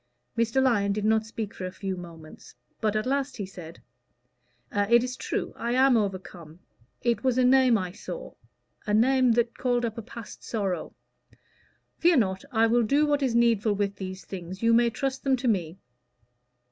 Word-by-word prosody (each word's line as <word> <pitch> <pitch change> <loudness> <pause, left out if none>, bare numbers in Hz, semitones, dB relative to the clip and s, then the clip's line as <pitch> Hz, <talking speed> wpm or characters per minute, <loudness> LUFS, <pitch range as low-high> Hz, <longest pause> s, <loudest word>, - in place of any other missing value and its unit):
Mr. 230 +3 +2
Lyon 205 -6 +2
did 210 0 -2
not 220 0 +2
speak 220 -2 -5
for 185 - -5
a - - -7
few 195 0 -4
moments, 165 -3 -12 0.2
but 215 -1 0
at 215 - 0
last 275 0 -1
he 205 - -3
said 175 -3 -11 0.9
"It 225 +3 +4
is 250 0 -4
true. - - -3
I 235 +1 -2
am 260 0 +5
overcome. 185 -6 -3 0.5
It 235 -3 +1
was 255 -2 +1
a 255 - +4
name 255 -2 +5
I 185 -3 -4
saw - - -8 0.5
a 210 - +2
name 255 +2 +4
that 235 0 0
called 245 -1 +1
up 230 0 -4
a - - -4
past 230 +1 -10
sorrow. 195 -7 -3 1.0
Fear 340 -1 +4
not; 190 -5 0
I 225 -1 +3
will 235 +1 +3
do 280 +7 +3
what 290 -1 +1
is 255 -4 0
needful 230 -3 +3
with 200 -1 -2
these 190 0 -7
things. 185 +2 -8
You 230 0 +4
may 235 0 +4
trust 265 +3 -3
them 270 -1 +3
to 250 0 -3
me." 180 -6 0
225 Hz, 185 wpm, -27 LUFS, 195-250 Hz, 1.0 s, am